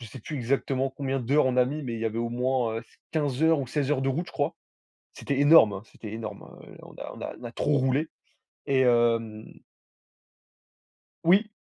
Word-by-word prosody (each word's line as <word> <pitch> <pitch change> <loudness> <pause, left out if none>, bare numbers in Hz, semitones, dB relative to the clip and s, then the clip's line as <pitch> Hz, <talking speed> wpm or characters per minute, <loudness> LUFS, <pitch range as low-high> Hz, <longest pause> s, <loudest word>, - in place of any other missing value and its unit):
je 115 - -8
sais 130 +2 -10
plus 150 - -7
exactement 135 +1 0
combien 135 0 -2
d'heures 135 +4 +2
on 130 -1 0
a 125 - +5
mis, 145 +4 -4
mais 120 -3 -4
il 115 - -5
y - - -2
avait 115 0 -2
au 115 0 -1
moins, 125 -1 0
heu, - - -8 0.3
15 145 -4 -1
heures 160 -1 +4
ou 130 - -4
16 145 +1 -1
heures 135 -3 +1
de 135 - +1
route, 165 +7 -1
je - - -12
crois. 145 +1 -1 0.6
C'était 140 -1 -3
énorme, 145 -8 +7
hein, 95 - -6
c'était 110 -1 -10
énorme, 110 -1 -6 0.2
heu, - - -14
on - - -13
a - - -8
on - - -12
a - - -5
on 120 - -12
a 120 - -6
trop 150 - +1
roulé 135 +4 +1 0.6
et 135 -1 +3
hem 115 -3 +2 1.8
Oui. 195 +6 +4
130 Hz, 215 wpm, -27 LUFS, 115-145 Hz, 1.8 s, énorme